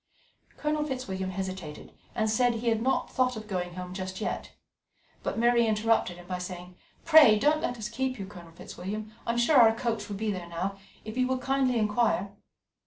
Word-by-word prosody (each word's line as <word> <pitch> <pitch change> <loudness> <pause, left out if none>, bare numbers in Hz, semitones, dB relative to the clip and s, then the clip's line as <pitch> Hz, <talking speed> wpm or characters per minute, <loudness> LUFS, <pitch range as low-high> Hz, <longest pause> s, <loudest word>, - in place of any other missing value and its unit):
Colonel 300 0 0
Fitzwilliam 225 -10 -3
hesitated, 185 -5 -6 0.2
and 220 -1 +1
said 235 +2 +2
he 230 +1 0
had 225 -1 +1
not 265 +3 0
thought 255 -2 +1
of 215 0 -8
going 180 -3 -3
home 180 0 -6
just 185 0 -5
yet; 215 - -3 0.7
but - - -3
Mary 235 0 +4
interrupted 215 -4 +1
him 175 - -12
by 180 0 -4
saying: 180 0 -7 0.3
"Pray 310 -10 +8
don't 300 +7 +2
let 245 - -2
us 215 -2 -4
keep 255 +3 -2
you, 195 - -5
Colonel 180 -4 -12
Fitzwilliam. 210 +6 -7
I 235 - +1
am - - -3
sure 255 +5 +4
our 225 -2 +7
coach 225 -3 -2
will 205 - -4
be 215 +1 -1
there 180 -3 -5
now, 190 +4 -3 0.3
if 220 +2 -6
you 255 0 +2
would 260 0 -1
kindly 265 -2 +1
inquire. 210 -2 +1
215 Hz, 195 wpm, -28 LUFS, 190-245 Hz, 0.7 s, Pray